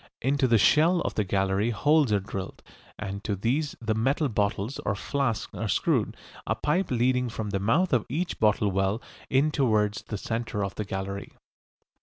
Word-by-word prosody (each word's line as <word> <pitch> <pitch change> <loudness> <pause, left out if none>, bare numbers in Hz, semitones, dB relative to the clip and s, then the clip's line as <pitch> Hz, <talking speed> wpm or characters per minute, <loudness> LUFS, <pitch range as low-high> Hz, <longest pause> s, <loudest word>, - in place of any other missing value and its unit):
Into 135 +1 +2
the 115 -2 +4
shell 165 - +4
of - - -2
the 105 - 0
gallery 95 +2 +1
holes 145 +3 +3
are 105 - +3
drilled, 95 -1 -6 0.3
and 100 -1 -5
to 105 - -1
these 135 +9 -1
the 110 -2 -1
metal 135 +6 +1
bottles 105 +3 -1
or 100 - -1
flasks 115 -2 -2
are 110 - -3
screwed, 95 - +1 0.3
a - - +1
pipe 175 +5 0
leading 125 0 +1
from 110 -2 -4
the 100 - 0
mouth 150 - +2
of 120 -4 +2
each 170 +8 -2
bottle 105 -1 +3
well 95 +3 0 0.3
in 140 +4 +3
towards 110 -8 +1
the 105 - -5
centre 115 -1 -3
of 95 - -5
the 105 - -4
gallery. 95 +1 -5
110 Hz, 180 wpm, -27 LUFS, 100-135 Hz, 0.3 s, the